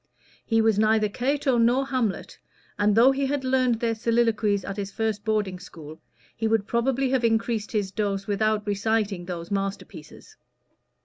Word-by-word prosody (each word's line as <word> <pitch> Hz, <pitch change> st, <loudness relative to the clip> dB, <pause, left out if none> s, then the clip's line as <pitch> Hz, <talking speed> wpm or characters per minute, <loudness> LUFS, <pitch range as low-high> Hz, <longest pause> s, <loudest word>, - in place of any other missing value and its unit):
He 225 Hz, -1 st, +2 dB
was 220 Hz, -2 st, +2 dB
neither 215 Hz, 0 st, +3 dB
Cato 260 Hz, +3 st, 0 dB
nor 245 Hz, +4 st, +3 dB
Hamlet, 255 Hz, -7 st, -3 dB, 0.4 s
and 205 Hz, 0 st, +3 dB
though 240 Hz, +4 st, +6 dB
he 270 Hz, 0 st, -1 dB
had 280 Hz, 0 st, -2 dB
learned 255 Hz, -3 st, +1 dB
their 230 Hz, -1 st, 0 dB
soliloquies 225 Hz, -3 st, +1 dB
at 195 Hz, -, -5 dB
his 200 Hz, -1 st, -5 dB
first 220 Hz, 0 st, -2 dB
boarding 210 Hz, -4 st, -1 dB
school, 160 Hz, -3 st, -12 dB, 0.3 s
he 225 Hz, -, -1 dB
would 220 Hz, -2 st, +1 dB
probably 255 Hz, +3 st, 0 dB
have 260 Hz, -2 st, +1 dB
increased 225 Hz, -1 st, 0 dB
his 205 Hz, -4 st, -1 dB
dose 200 Hz, -2 st, -2 dB
without 215 Hz, +1 st, 0 dB
reciting 205 Hz, -2 st, -1 dB
those 170 Hz, -1 st, -6 dB
master 195 Hz, 0 st, -2 dB
pieces. 155 Hz, -5 st, -14 dB
220 Hz, 165 wpm, -25 LUFS, 200-235 Hz, 0.4 s, though